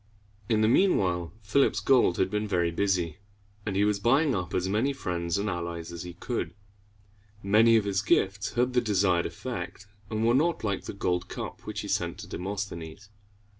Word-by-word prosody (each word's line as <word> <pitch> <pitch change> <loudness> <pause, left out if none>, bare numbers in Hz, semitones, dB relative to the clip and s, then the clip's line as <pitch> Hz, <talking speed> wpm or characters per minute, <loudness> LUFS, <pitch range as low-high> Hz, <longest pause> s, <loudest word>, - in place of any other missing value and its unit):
In 110 -2 +3
the 110 - +4
mean 185 - +4
while, 90 -3 -1
Philip's 135 +7 +2
gold 125 -9 +3
had 95 0 +1
been 105 0 -1
very 85 -4 +1
busy, 90 -1 0 0.5
and 100 - -1
he 100 +1 +3
was 105 -1 +1
buying 135 +7 +3
up 90 -3 -3
as 90 - 0
many 110 +8 +1
friends 85 -9 -2
and 100 +1 -1
allies 85 -2 -4
as 85 -1 -6
he 90 -1 -8
could. 120 +5 -4 0.9
Many 110 +4 +5
of 105 - +1
his 100 -1 0
gifts 100 0 +1
had 125 +1 +1
the 125 - +3
desired 95 -5 +2
effect, 100 -5 -6 0.2
and 110 +1 -1
were 120 - +4
not 160 +4 +2
like 100 -3 -2
the - - -5
gold 90 -2 -1
cup - - -6
which - - -3
he - - -6
sent - - -1
to - - -9
Demosthenes. 95 -1 -5
100 Hz, 190 wpm, -28 LUFS, 90-110 Hz, 0.9 s, Many